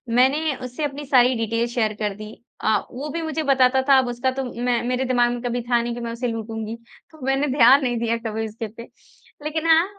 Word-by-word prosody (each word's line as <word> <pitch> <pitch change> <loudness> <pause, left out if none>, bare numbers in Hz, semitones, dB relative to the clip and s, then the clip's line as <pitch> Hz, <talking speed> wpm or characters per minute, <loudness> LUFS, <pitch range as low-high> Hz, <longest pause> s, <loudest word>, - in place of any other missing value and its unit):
मैंने 280 +4 +3
उससे 250 +5 -5
अपनी 290 0 -3
सारी 255 -2 +4
डिटेल्स 230 +1 -1
शेयर 220 -3 +1
कर 210 -1 0
दी, 215 +1 -9 0.3
अ, 220 0 +3
वो 280 +5 -6
भी 335 +3 -3
मुझे 315 -1 -2
बताता 265 -1 +4
था। 275 - +8
अब 260 - 0
उसका 245 +2 -1
तो 265 +1 -3
मैं 240 0 0
मेरे 255 +1 0
दिमाग़ 245 -1 +2
में 240 - -5
कभी 245 0 -2
था 240 -1 +3
नहीं 240 0 -4
मैं 235 - -4
उसे 235 +2 -3
लूटूँगी 225 -1 -4 0.4
तो 315 -2 -17
मैंने 270 +2 +1
ध्यान 270 +3 +7
नहीं 245 -2 0
दिया 230 0 0
कभी 220 0 -3
उसके 220 +1 -6
पे। 230 +3 -11 0.6
लेकिन 315 +1 -2
हाँ, 325 +1 +6
245 Hz, 220 wpm, -22 LUFS, 230-270 Hz, 0.6 s, था